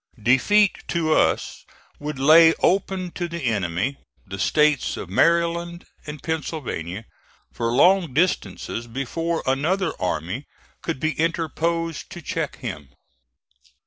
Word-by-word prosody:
Defeat 185 - +4
to 160 -2 +1
us - - +1 0.4
would 150 -1 -5
lay 160 +4 +7
open 185 -1 +1
to 175 0 -4
the 170 -2 -6
enemy 105 +3 -1 0.3
the 95 -1 -7
States 150 +4 +2
of 90 - -7
Maryland 170 - +1 0.2
and 150 -1 -7
Pennsylvania 125 - -4 0.5
for 115 -1 -1
long 175 +5 +4
distances 120 - -1
before 165 +7 -3
another 160 +7 0
army 90 - -3 0.3
could 165 -5 -3
be 160 +2 0
interposed 165 0 -1
to 185 - -8
check - - -3
him. 75 -2 -7
155 Hz, 115 wpm, -23 LUFS, 120-170 Hz, 0.5 s, lay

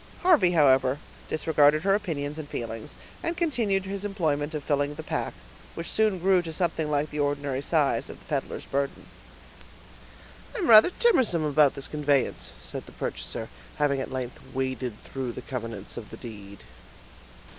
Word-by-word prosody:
Harvey, 270 - +5
however, 135 -4 +4 0.3
disregarded 155 -1 +3
her 195 0 +3
opinions 160 -7 -2
and 150 -2 -7
feelings, 115 -2 -5 0.2
and 335 0 -2
continued 230 - +1
his 195 +1 -4
employment 160 -7 -1
of 150 - -4
filling 145 0 0
the 160 - -7
pack, - - -2 0.4
which 165 - -4
soon 215 -3 +2
grew 185 +1 +3
to 165 -2 -6
something 160 -2 0
like 145 0 0
the 150 - -4
ordinary 145 -2 -1
size 145 -1 +1
of - - -8
the - - -20
peddler's - - -3
burden. 140 0 -2 1.5
"I'm - - -1
rather 215 +8 +10
timersome 260 - +3
about 145 -1 +4
this 140 - -3
conveyance," 145 -3 0
said - - -8
the - - -12
purchaser, - - -4 0.3
having 140 -2 +1
at - - -5
length 130 -1 -4 0.2
waded 130 -4 -2
through 130 -3 -5
the 125 - -8
covenants 115 -6 -6
of 110 - -7
the - - -9
deed. 100 - -10
145 Hz, 160 wpm, -27 LUFS, 135-180 Hz, 1.5 s, rather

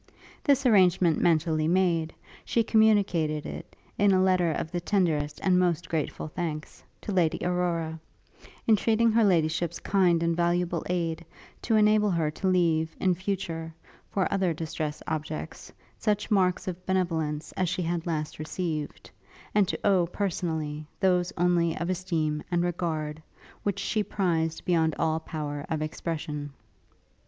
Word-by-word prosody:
This 280 -2 +3
arrangement 185 -7 +4
mentally 160 -2 +2
made, 170 -2 +2 0.3
she 230 - +1
communicated 200 -9 +2
it, - - -8 0.2
in 205 0 +5
a 190 - +4
letter 185 -3 +3
of 160 +1 -3
the 175 -1 -2
tenderest 160 -6 0
and 180 -1 +4
most 175 -2 +1
grateful 160 -1 -2
thanks, 155 -2 -5 0.2
to - - -5
Lady 175 -5 +2
Aurora; 170 -3 -1 0.7
entreating 225 +1 +3
her 225 +1 +4
ladyship's 170 -3 +1
kind 180 -4 +2
and 170 0 +1
valuable 175 0 0
aid, 170 -2 -1 0.4
to 225 - +1
enable 210 0 +4
her 165 -4 0
to 190 +5 -3
leave, 165 -3 +2
in 185 -1 +3
future, 175 -3 -3 0.4
for 190 -2 0
other 185 -4 +1
distressed 155 -1 -4
objects, 150 - -5 0.3
such 210 0 0
marks 185 -3 +2
of 180 0 -5
benevolence 160 -5 -1
as 185 -2 -1
she 180 +1 -2
had 170 0 -2
last 155 -2 -3
received; 155 -1 -4 0.4
and 205 -2 +4
to - - -2
owe, 190 -4 +4
personally, 160 -5 -3
those, 180 0 +2
only, 175 -1 +2
of 170 +3 -1
esteem 165 -5 -1
and 175 -1 +1
regard; 160 -3 -2 0.4
which 200 -2 -1
she 215 - 0
prized 165 -6 -1
beyond 160 -3 +2
all 160 0 +1
power 150 -2 -5
of 160 - -1
expression. 155 -1 -4
170 Hz, 145 wpm, -27 LUFS, 160-185 Hz, 0.7 s, in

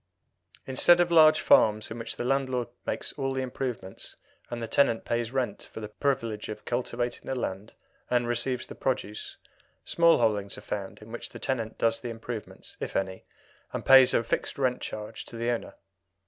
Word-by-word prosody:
Instead 170 +6 +5
of 175 -1 +3
large 155 -2 +7
farms 110 0 +4
in 115 - -5
which 115 - -4
the 120 - -4
landlord 130 -2 0 0.2
makes - - -3
all 135 -1 0
the 130 0 -1
improvements 125 -6 -5 0.3
and 120 - -4
the 115 - -4
tenant 115 -2 +2
pays 120 0 -1
rent 130 -2 -2
for - - -7
the 105 -1 -6
privilege 115 -4 -2
of 105 0 -7
cultivating 120 0 -2
the 130 -1 -2
land 100 0 -5 0.3
and 120 -1 +2
receives 120 +1 0
the - - -9
produce, 110 -5 -3 0.5
small 170 0 +5
holdings 100 -2 0
are - - -9
found 100 +1 -5
in 110 - -13
which 120 - -6
the - - -10
tenant 115 -4 -2
does 115 0 +2
the 120 - -5
improvements 115 -1 -7
(if - - -5
any) 95 -1 -2 0.5
and - - -4
pays 135 -1 +8
a - - +3
fixed - - -2
rent 130 -2 0
charge 105 +1 -6
to - - -10
the 120 +1 0
owner. 120 - -4
120 Hz, 185 wpm, -28 LUFS, 110-130 Hz, 0.5 s, pays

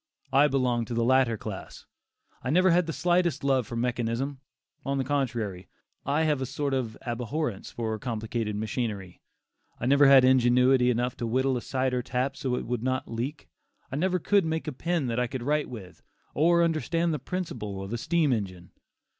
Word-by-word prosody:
I 140 +2 +6
belong 125 -4 +1
to 120 - -5
the 115 - +1
latter 130 -2 +3
class; 105 -2 -8 0.6
I - - -2
never 185 +5 +4
had 175 0 +3
the - - -1
slightest 175 -3 +1
love 135 -5 +2
for 120 - -6
mechanism; 120 +3 -2 0.4
on 140 0 -1
the 135 - 0
contrary, 120 -9 -2 0.4
I 145 +3 +2
have 150 -4 +1
a 130 - -2
sort 140 +1 -2
of 125 -4 -2
abhorrence 120 0 -3
for 110 -2 -3
complicated 110 -2 -3
machinery. 105 -3 -4 0.6
I - - -3
never 140 +2 +6
had 135 -2 +8
ingenuity 125 0 +4
enough 125 +1 0
to 120 - -3
whittle 130 +3 +1
a 120 - -2
cider 130 -1 -1
tap 130 +3 -2
so 130 -3 -2
it - - -4
would 120 -2 -2
not 130 0 -2
leak. 120 - -4 0.4
I - - -3
never 185 +5 +1
could 200 +3 +2
make 160 0 -2
a - - -1
pen 165 +2 -1
that 120 -1 -1
I 125 - +1
could 130 0 -5
write 150 +2 0
with, 100 -7 -10 0.3
or 170 +4 +4
understand 165 +1 0
the 150 - -2
principle 120 - -5
of 95 +4 -6
a - - -1
steam 165 -1 +2
engine. 95 -6 -5
130 Hz, 190 wpm, -27 LUFS, 115-145 Hz, 0.6 s, had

